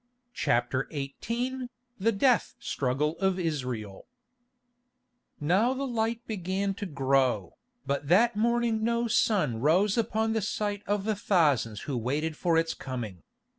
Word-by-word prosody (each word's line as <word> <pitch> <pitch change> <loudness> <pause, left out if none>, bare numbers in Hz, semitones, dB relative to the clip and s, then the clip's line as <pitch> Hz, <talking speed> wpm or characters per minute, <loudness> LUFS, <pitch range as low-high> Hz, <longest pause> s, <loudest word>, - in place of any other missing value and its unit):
CHAPTER 130 - 0
XVIII 240 - -3 0.3
THE 225 +4 +3
DEATH 240 +3 +2
STRUGGLE 145 +4 -1
OF 190 -1 +1
ISRAEL 125 - -3 1.3
Now 195 - +2
the 275 +1 -2
light 230 -1 -1
began 195 -1 -2
to 200 +1 -5
grow, 135 - +1 0.3
but 140 0 -2
that 210 +8 +4
morning 230 0 +1
no 235 +1 +1
sun 185 - +2
rose 190 - +3
upon 220 0 0
the 220 - 0
sight 205 0 -2
of 205 0 0
the 215 +1 0
thousands 145 - +2
who 140 - -4
waited 150 +7 -1
for 170 +1 +1
its 165 0 +1
coming. 115 -9 -6
185 Hz, 135 wpm, -28 LUFS, 140-220 Hz, 1.3 s, that